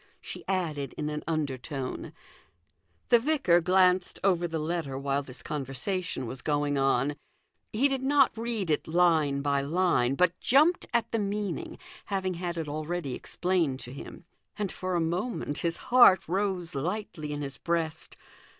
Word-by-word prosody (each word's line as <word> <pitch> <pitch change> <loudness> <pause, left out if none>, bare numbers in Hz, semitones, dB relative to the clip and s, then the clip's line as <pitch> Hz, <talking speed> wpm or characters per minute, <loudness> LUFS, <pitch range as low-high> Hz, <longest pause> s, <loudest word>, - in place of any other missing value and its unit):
she - - -8
added 155 -8 -2
in 150 0 -2
an 150 0 -4
under 150 -5 -1
tone. 135 -1 -5 1.0
The 240 - +7
vicar 250 - +3
glanced 185 +1 +3
over 175 -3 +2
the 165 -1 -3
letter 155 -3 -2
while 140 +1 0
this 130 -2 -8
conversation 145 +2 -3
was 125 +3 -6
going 145 -1 0
on. 135 +1 +2 0.6
He 250 +6 +3
did 270 -2 -2
not 275 0 +4
read 225 -6 -2
it 150 - 0
line 160 -5 +3
by 140 -1 +1
line, 140 -4 +2
but 180 +2 +2
jumped 310 +7 +3
at 235 -2 0
the 230 - 0
meaning, 210 - -3 0.3
having 190 -2 -1
had 175 0 -4
it 160 -2 -3
already 155 -1 -3
explained 170 -4 -1
to 125 - -8
him. 140 - -10 0.3
And 205 -3 -2
for 185 -1 -3
a - - +2
moment 170 -1 -2
his 170 -1 -1 0.2
heart 200 -8 +7
rose 185 -1 -1
lightly 160 0 -3
in 145 0 -3
his 135 -1 -6
breast. 165 -2 -2
170 Hz, 160 wpm, -28 LUFS, 145-190 Hz, 1.0 s, The